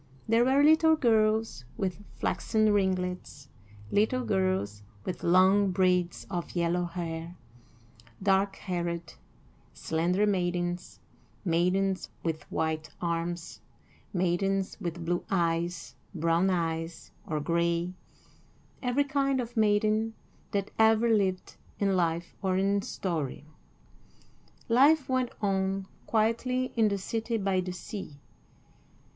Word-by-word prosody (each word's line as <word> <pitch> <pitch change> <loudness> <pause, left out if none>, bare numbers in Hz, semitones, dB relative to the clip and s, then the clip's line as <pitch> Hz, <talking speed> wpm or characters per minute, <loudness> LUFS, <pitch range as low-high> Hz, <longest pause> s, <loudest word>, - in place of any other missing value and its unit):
There 225 +1 +4
were 270 +3 +4
little 315 +1 +6
girls 220 - +2
with 190 +1 -3
flaxen 215 -2 +1
ringlets, 180 -7 -1 0.4
little 245 +5 +2
girls 185 - 0 0.2
with 175 -2 -4
long 190 +3 +5
braids 180 -1 +1
of 175 -3 -5
yellow 175 +1 +1
hair; 170 0 -5 0.9
dark 195 0 +2
haired, 170 -3 -4 0.6
slender 175 +5 +1
maidens, 175 -3 -1 0.5
maidens 185 +3 +1
with 160 -2 -3
white 160 -1 -1
arms, 170 0 -3 0.5
maidens 190 +1 0
with 170 -2 -4
blue 175 +1 0
eyes, 170 -1 -1 0.2
brown 165 +3 +2
eyes, 165 -2 -2 0.2
or 155 -2 -1
gray 170 +3 0 0.9
every 255 +2 +2
kind 275 -1 0
of 240 0 -4
maiden 215 +1 +2 0.3
that 200 -1 -2
ever 220 +1 +5
lived, 190 -3 0 0.2
in 195 -1 +1
life 170 -1 0
or 190 -2 +1
in 200 +1 +2
story. 155 -8 -3 1.2
Life 275 +5 +5
went 255 -2 +1
on 195 -1 0 0.2
quietly 245 +3 +1
in 225 -2 +4
the 200 -1 0
city 225 +4 -2
by 195 -2 +1
the 180 0 -4
sea. 180 -4 -7
190 Hz, 110 wpm, -29 LUFS, 170-215 Hz, 1.2 s, little